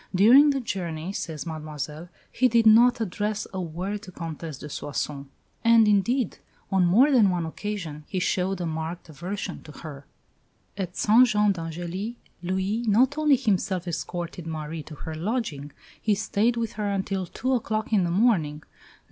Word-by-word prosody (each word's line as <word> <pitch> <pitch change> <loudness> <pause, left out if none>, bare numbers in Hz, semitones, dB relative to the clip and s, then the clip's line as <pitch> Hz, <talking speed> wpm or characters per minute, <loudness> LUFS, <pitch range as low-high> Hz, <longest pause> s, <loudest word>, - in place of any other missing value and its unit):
"During 250 +10 +7
the 275 -1 +1
journey," 180 -6 -4
says 160 -7 -5
Mademoiselle, 155 0 -6 0.2
"he 255 - +3
did 230 -1 +3
not 235 +3 +6
address 210 0 -2
a 190 - -2
word 180 +5 -4
to 195 - -11
the 185 - -16
Comtesse 165 -3 -6
de 150 - -8
Soissons"; 140 -1 -4 0.4
and, 230 -1 +6
indeed, 210 +3 +1 0.3
on 190 -2 +3
more 245 +12 +5
than 230 -7 +5
one 175 -2 -1
occasion 160 -4 -5
he 190 - -4
showed 185 +1 0
a 175 - -2
marked 160 +1 -4
aversion 180 +5 -5
to 150 - -12
her. 145 -2 -10 0.7
At 185 -3 -5
St 235 +4 +6
Jean 210 -2 +3
d'Angely, 175 +5 -4 0.3
Louis 190 +5 -1
not 250 +7 +4
only 300 -2 +5
himself 195 -7 0
escorted 175 0 -4
Marie 160 0 -5
to 155 +1 -10
her 160 - -7
lodging; 160 - -3 0.3
he 215 -2 +2
stayed 220 +3 +1
with 230 -2 -1
her 210 -1 -2
until 195 -1 -2
two 260 +8 -2
o'clock 220 -2 -1
in 200 -4 +4
the 175 - 0
morning. 170 -7 +2
190 Hz, 165 wpm, -26 LUFS, 165-220 Hz, 0.7 s, During